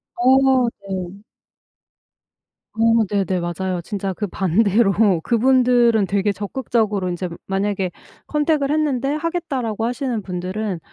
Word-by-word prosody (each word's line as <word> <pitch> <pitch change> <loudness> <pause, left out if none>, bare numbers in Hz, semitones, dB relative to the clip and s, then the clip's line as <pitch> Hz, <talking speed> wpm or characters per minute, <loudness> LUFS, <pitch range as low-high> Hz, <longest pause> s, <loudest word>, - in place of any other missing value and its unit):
어. 260 0 +4 0.2
네. 190 0 -5 1.5
어 225 0 +3
네네. 195 -2 0
맞아요. 175 +1 -3
진짜 195 +2 -4
그 210 +3 -3
반대로 195 +3 +2 0.3
그분들은 240 -2 +3
되게 200 +1 0
적극적으로 210 -2 -1
인제 180 +1 -3 0.2
만약에 195 -1 -1 0.4
컨택을 300 -2 +1
했는데 285 -4 0
"하겠다."라고 280 - -2
하시는 245 -2 -2
분들은 185 +1 -4
215 Hz, 260 characters per minute, -20 LUFS, 195-255 Hz, 1.5 s, 어